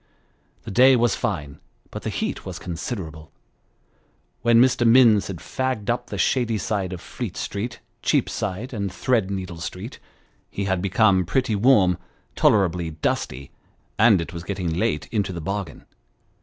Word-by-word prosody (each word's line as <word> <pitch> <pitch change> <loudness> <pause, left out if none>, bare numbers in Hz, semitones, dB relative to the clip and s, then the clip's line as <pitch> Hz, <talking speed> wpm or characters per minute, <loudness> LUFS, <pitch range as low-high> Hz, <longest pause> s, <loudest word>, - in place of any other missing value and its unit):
The - - -7
day 130 +6 +6
was 120 -1 +2
fine, 75 -12 -3 0.3
but - - -6
the - - -3
heat - - -3
was - - -6
considerable; 80 - -6 1.1
when 115 0 +5
Mr. 125 0 +4
Minns 115 -3 +6
had 95 - -5
fagged 120 - -2
up 120 - -3
the - - -5
shady 120 -4 +1
side 100 -3 -2
of 90 - -5
Fleet 100 +1 -6
Street, 110 +4 -4 0.2
Cheapside, 110 +8 -1
and 100 -4 -3
Thread 110 -1 0
needle 95 -3 -5
Street, 90 +7 -7 0.5
he 100 - -4
had 95 -2 0
become 100 0 +3
pretty 115 +5 0
warm, 100 -6 +4 0.4
tolerably 90 -5 +2
dusty, 70 -4 -3 0.5
and 110 -3 +6
it 85 +1 -5
was 85 -1 -6
getting 90 -3 -3
late 90 -3 0
into 105 -4 0
the 85 - -5
bargain. 95 -2 -5
100 Hz, 150 wpm, -23 LUFS, 90-115 Hz, 1.1 s, day